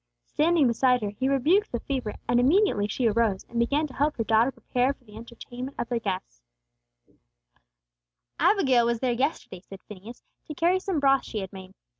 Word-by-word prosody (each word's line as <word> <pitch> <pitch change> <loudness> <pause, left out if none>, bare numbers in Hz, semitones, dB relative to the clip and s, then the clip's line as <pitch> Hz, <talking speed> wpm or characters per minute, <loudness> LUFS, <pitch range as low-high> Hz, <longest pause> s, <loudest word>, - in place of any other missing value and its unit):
Standing 325 -1 +2
beside 250 0 +2
her, 205 - -2
He 260 +6 -2
rebuked 320 - +2
the 240 - -2
fever; 255 -6 -4
and 240 0 +3
immediately 270 - +3
she 240 +4 -2
arose, 215 -3 0
and 235 - -4
began 285 +6 +1
to 280 - -9
help 295 +3 0
her 225 - 0
daughter 225 +3 +3
prepare 255 +1 -1
for 270 - -28
the 210 -3 -16
entertainment 240 +3 -9
of 240 - -4
their 240 -2 -1
guest. 185 - -5 2.0
"Abigail 265 - +3
was 235 -1 0
there 250 -1 0
yesterday," 245 - -3
said 195 0 -13
Phineas, 210 +4 -12 0.2
"to 305 - -7
carry 350 +5 +2
some 370 -4 -2
broth 275 -1 +3
she 215 - -4
had 190 0 -8
made. 190 0 -11
245 Hz, 185 wpm, -26 LUFS, 220-275 Hz, 2.0 s, and